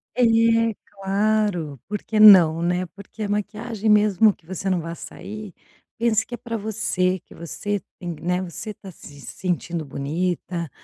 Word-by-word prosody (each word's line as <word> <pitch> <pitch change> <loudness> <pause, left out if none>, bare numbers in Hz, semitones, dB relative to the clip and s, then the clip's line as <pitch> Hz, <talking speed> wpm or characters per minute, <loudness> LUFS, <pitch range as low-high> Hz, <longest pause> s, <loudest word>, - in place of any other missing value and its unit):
É, - - -6 0.7
claro, 195 - 0
por 210 0 -4
que 220 - -1
não, 180 -6 +8
né? 180 +1 0
Porque 205 +2 -8
a 205 - -3
maquiagem 215 +1 -2
mesmo 210 0 +5
que 165 - -29
você 190 +2 -4
não 180 -2 +1
vá 165 +1 -6
sair, 210 +1 -9 0.4
pense 225 -2 +2
que 240 - -11
é - - -3
pra 230 0 -5
você, 190 -3 0
que - - -16
você 200 +4 -4 0.2
tem, 175 -2 -5
né, 180 +2 0
você 185 +4 -6
tá 195 -2 -12
se 145 -4 -13
sentindo 170 +1 -3
bonita, 170 +4 -3
190 Hz, 160 wpm, -23 LUFS, 175-210 Hz, 0.7 s, não